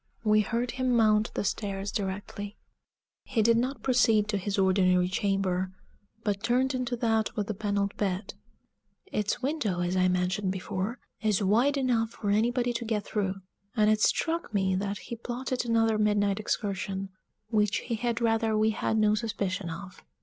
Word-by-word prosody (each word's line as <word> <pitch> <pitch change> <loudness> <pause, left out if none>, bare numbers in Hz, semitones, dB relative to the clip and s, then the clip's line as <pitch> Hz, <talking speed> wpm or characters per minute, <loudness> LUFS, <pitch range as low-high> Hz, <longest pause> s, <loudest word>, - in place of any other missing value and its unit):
We 215 -1 +4
heard 235 +3 -1
him 255 -1 0
mount 215 -1 +3
the - - 0
stairs 200 -1 -2
directly. 200 +1 -4 0.7
He 225 -3 0
did 230 +1 +5
not 255 +4 -1
proceed 225 -5 +3
to 205 -2 0
his 200 +2 -2
ordinary 185 -2 +3
chamber, 190 -1 0 0.5
but 200 -2 -1
turned 255 +4 +2
into 255 -1 -1
that 225 -1 0
with 210 -3 -1
the 215 - -3
paneled 200 -1 -1
bed; 195 -1 -2 0.8
its 210 +4 -1
window, 255 - 0
as 175 +1 0
I 185 0 +3
mentioned 180 +2 0
before, 190 +4 -3 0.2
is 210 -2 +1
wide 240 +9 +3
enough 240 -4 +1
for 210 -3 -3
anybody 240 +3 +2
to 235 - -3
get 220 -2 -1
through, 195 -2 -2 0.3
and 215 -2 +4
it 215 0 +2
struck 330 -4 +1
me 190 -1 +2
that 200 +2 -1
he 235 - -7
plotted 245 +2 -3
another 225 -2 +2
midnight 205 -1 +2
excursion, 195 -2 -2 0.4
which 210 -2 +2
he - - -4
had 235 +1 -1
rather 225 -1 +2
we 215 +1 +3
had 220 0 -1
no 215 -1 +4
suspicion 200 -5 -2
of. 180 +3 -8
210 Hz, 165 wpm, -28 LUFS, 195-230 Hz, 0.8 s, did